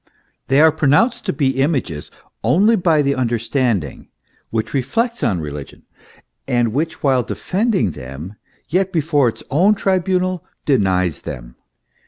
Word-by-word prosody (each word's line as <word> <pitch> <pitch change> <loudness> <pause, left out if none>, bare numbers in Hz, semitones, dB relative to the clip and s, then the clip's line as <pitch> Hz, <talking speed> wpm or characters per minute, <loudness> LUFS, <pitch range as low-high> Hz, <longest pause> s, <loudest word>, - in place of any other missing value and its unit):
They 135 +1 +3
are 160 0 +7
pronounced 185 - +2
to - - +2
be 135 -2 0
images 130 - -1 0.3
only 210 +6 +4
by 165 -6 +2
the 140 0 +1
understanding, 115 - -1 0.4
which 110 -1 -3
reflects 225 - -1
on 90 -4 +1
religion, 75 -2 -8 0.6
and 120 -4 +1
which 160 +5 -2
while 135 -3 +3
defending 190 - -1
them 70 +8 -8 0.3
yet 185 +7 0
before 150 -6 +2
its - - -9
own 185 +9 +4
tribunal 185 -2 0 0.2
denies 95 - +1
them. - - -8
135 Hz, 130 wpm, -19 LUFS, 110-180 Hz, 0.6 s, are